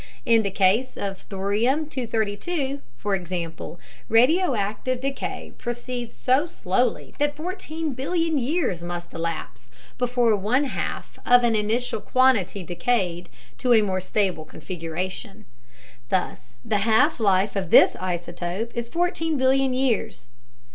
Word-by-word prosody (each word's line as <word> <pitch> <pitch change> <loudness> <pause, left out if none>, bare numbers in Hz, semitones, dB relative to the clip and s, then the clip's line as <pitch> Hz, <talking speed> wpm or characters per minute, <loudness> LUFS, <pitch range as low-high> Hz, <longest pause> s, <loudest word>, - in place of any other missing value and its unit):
In 230 -1 +5
the 200 - -1
case 200 +6 +2
of 195 -1 -4
thorium 210 +10 +1
232, 265 - -2 0.2
for 205 +8 -2
example, 175 -2 -4 0.3
radioactive 250 - +2
decay 275 +1 -4
proceeds 240 0 -5
so 265 +6 +2
slowly 240 - -1
that 290 0 +1
14 325 -2 -4
billion 325 +3 0
years 260 - 0
must 175 0 -6
elapse 165 -8 -5 0.3
before 245 -2 +3
one 215 +8 +1
half 275 - -4
of 245 0 +6
an 235 -2 +3
initial 215 +2 0
quantity 240 -7 +2
decayed 175 -1 -1 0.3
to 250 -1 +3
a 220 - +5
more 190 -2 -1
stable 185 -4 0
configuration. 180 +6 -6 0.6
Thus 125 -10 -2
the 210 -2 +1
half 230 +8 +3
life 200 -1 +2
of 190 -4 -2
this - - +7
isotope 180 +4 -4
is 235 0 -4
14 325 -1 0
billion 265 0 +3
years. 255 - -1
225 Hz, 125 wpm, -24 LUFS, 185-260 Hz, 0.6 s, this